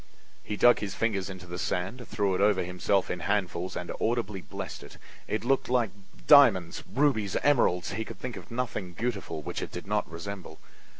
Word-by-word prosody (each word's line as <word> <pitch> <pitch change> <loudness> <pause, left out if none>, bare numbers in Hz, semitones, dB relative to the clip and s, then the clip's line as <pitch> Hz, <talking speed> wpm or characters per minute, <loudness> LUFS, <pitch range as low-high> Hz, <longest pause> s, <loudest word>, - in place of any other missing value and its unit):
He 105 - -4
dug 120 +3 +6
his 100 -2 -4
fingers 100 -4 -1
into 95 -1 -8
the 90 0 -6
sand, 100 +8 -2
threw 100 -2 0
it 90 - 0
over 100 -2 +4
himself 90 +2 0
in 90 - -3
handfuls 95 -2 -1
and 90 - -4
audibly 110 -4 0
blessed - - -7
it. - - -12 0.3
It 110 +2 -2
looked 135 0 +1
like 120 -5 +2 0.3
diamonds, 85 +6 +6
rubies, 115 -7 +2
emeralds; 115 -11 +3
he 110 +3 -2
could - - -9
think 125 -2 -5
of 95 - -10
nothing 115 -7 -3
beautiful 100 -8 -3
which - - -4
it - - -5
did - - -7
not - - -1
resemble. 85 0 -7
100 Hz, 185 wpm, -28 LUFS, 90-115 Hz, 0.3 s, dug